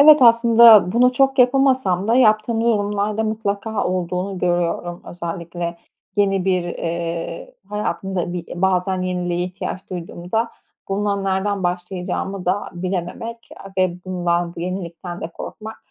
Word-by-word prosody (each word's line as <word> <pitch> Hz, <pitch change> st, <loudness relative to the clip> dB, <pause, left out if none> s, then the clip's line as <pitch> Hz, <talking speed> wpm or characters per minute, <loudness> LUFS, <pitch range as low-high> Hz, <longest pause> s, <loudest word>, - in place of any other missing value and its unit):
Evet, 305 Hz, +1 st, +10 dB
aslında 230 Hz, -4 st, +7 dB
bunu 250 Hz, +2 st, +4 dB
çok 270 Hz, +1 st, +2 dB
yapamasam 250 Hz, -7 st, +3 dB
da 230 Hz, -, +4 dB
yaptığım 225 Hz, -2 st, +3 dB
durumlarda 210 Hz, -1 st, 0 dB
mutlaka 215 Hz, 0 st, -2 dB
olduğunu 180 Hz, +1 st, -2 dB
görüyorum. 175 Hz, 0 st, -1 dB
Özellikle 170 Hz, 0 st, -5 dB, 0.4 s
yeni 195 Hz, -2 st, +2 dB
bir, 185 Hz, -2 st, +2 dB
eee, 170 Hz, -, -4 dB
hayatımda 190 Hz, -4 st, -2 dB
bir 175 Hz, -2 st, -5 dB, 0.2 s
bazen 185 Hz, 0 st, +1 dB
yeniliğe 180 Hz, -1 st, -1 dB
ihtiyaç 185 Hz, +1 st, -6 dB
duyduğumda 180 Hz, +5 st, -3 dB, 0.4 s
bununla 200 Hz, +1 st, 0 dB
nereden 195 Hz, +1 st, -1 dB
başlayacağımı 180 Hz, +1 st, -3 dB
da 190 Hz, +3 st, -1 dB
bilememek 185 Hz, +6 st, -4 dB, 0.2 s
a -, -, -8 dB
ve 180 Hz, -1 st, 0 dB
bundan, 175 Hz, -2 st, -1 dB
bu -, -, -7 dB
yenilikten 175 Hz, -1 st, -5 dB
de -, -, -4 dB
korkmak 220 Hz, +5 st, -8 dB
190 Hz, 125 wpm, -21 LUFS, 175-215 Hz, 0.4 s, Evet